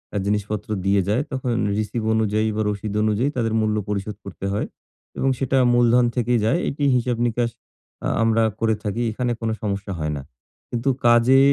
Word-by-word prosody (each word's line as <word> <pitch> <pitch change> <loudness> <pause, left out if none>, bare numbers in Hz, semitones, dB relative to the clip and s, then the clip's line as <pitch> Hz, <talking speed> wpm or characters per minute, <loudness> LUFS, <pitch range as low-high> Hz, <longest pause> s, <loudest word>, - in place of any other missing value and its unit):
আ - - +2
জিনিসপত্র 105 +1 -2 0.2
দিয়ে 100 0 +3
যায়, 110 +6 +2
তখন 130 -1 -2 0.3
রিসিভ 110 +2 -2
অনুযায়ী 110 0 +1
বা 110 - 0
রশিদ 105 0 -3
অনুযায়ী 110 +6 +1
তাদের 115 -2 0
মূল্য 105 0 +1
পরিশোধ 105 +1 -3
করতে 100 0 -7
হয় 105 - -1 0.5
এবং 135 - +1
সেটা 135 0 +1 0.2
মূলধন 120 0 +4
থেকেই 120 -1 +2
যায়। 165 +10 +2
এটি 145 +1 -4
হিসাব-নিকাশ 120 -1 0 0.6
আ - - +1 0.2
আমরা 115 0 +3 0.2
করে 110 -1 +2
থাকি। 105 +3 -2
এখানে 120 +2 -1
কোনো 110 -1 0
সমস্যা 100 -1 -3
হয় 75 0 -1
না। - - -5 0.5
কিন্তু 120 +3 -1 0.2
কাজে 120 +3 +6
110 Hz, 170 wpm, -22 LUFS, 105-120 Hz, 0.6 s, কাজে